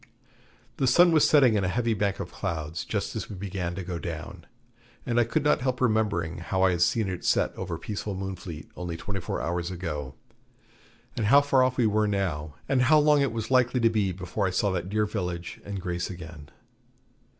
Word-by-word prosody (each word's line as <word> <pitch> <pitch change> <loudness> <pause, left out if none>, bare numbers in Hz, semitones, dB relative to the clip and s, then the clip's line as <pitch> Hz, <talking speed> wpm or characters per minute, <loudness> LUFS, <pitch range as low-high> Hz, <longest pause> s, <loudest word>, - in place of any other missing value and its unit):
The 135 - +1
sun 175 +7 +6
was 155 -2 +5
setting 135 -6 +6
in 105 -2 +1
a - - +1
heavy 115 +4 0
bank 100 -1 -1
of - - -5
clouds 80 0 -4
just - - -3
as - - -4
we 105 - -6
began 90 -2 -4
to 95 - -5
go 90 -1 -4
down, 85 +1 -7 0.6
and 120 -1 +1
I - - +5
could 145 +6 0
not 150 - +3
help 130 0 -1
remembering 105 -9 0
how 95 +2 -1
I 95 - +5
had 85 -1 -1
seen 110 +4 +2
it 90 -2 -4
set - - +1
over - - -4
peaceful 105 -1 -5
Moonfleet 95 -4 -6
only 90 -2 -5
twenty 95 +4 -4
four 85 - -4
hours 85 0 -2
ago; 75 -7 -5 1.0
and 110 - 0
how 140 +6 +7
far 140 -2 +3
off 130 0 0
we 120 - +3
were 105 0 +2
now, 80 -8 -2
and 135 -2 +2
how 145 +5 +5
long 150 -1 +4
it 140 -4 +1
was 115 +1 -4
likely 125 -1 +3
to 115 -1 +3
be 105 -4 +1
before 95 +2 -2
I - - 0
saw 100 +2 +1
that 90 0 -3
dear 105 +1 +1
village 90 -5 -4
and 100 -1 -5
Grace 90 -1 -3
again. 85 -5 -9
95 Hz, 210 wpm, -27 LUFS, 85-115 Hz, 1.0 s, how